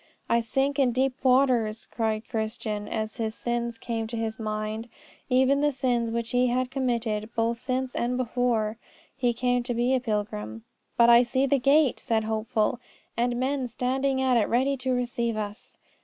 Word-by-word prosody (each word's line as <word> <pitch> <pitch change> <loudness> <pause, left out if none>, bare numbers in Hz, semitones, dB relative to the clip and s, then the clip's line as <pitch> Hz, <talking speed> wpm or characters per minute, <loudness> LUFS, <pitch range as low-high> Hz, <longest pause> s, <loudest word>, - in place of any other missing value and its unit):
"I 235 - +3
sink 270 +5 0
in 255 -3 +3
deep 260 +1 0
waters," 250 -4 +3
cried 220 -1 -2
Christian, 215 -2 -3
as 220 0 -3
his 220 -1 -2
sins 235 -1 -2
came 225 -1 -3
to 230 +1 -5
his 225 0 -3
mind, 215 +1 -3 0.4
even 265 +2 +3
the 295 0 +3
sins 245 -3 0
which 230 0 -3
he 250 0 +3
had 250 +1 0
committed 235 -5 -1
both 230 +1 0
since 255 0 -2
and 245 +1 -1
before 235 -3 0 0.4
he 250 -2 +1
came 245 +1 +1
to 240 0 -3
be 240 +2 +2
a 260 - +3
pilgrim. 205 - -3 0.3
"But 235 0 +7
I 235 0 +8
see 260 +2 +1
the 275 0 +2
gate," 280 +1 +3
said 220 -1 0
Hopeful, 220 +1 0 0.4
"and 240 +1 0
men 265 0 0
standing 265 +2 0
at 255 -2 +3
it 215 - +1
ready 265 +4 +2
to 260 0 -2
receive 240 -2 -1
us." 210 0 -6
240 Hz, 175 wpm, -26 LUFS, 220-255 Hz, 0.4 s, I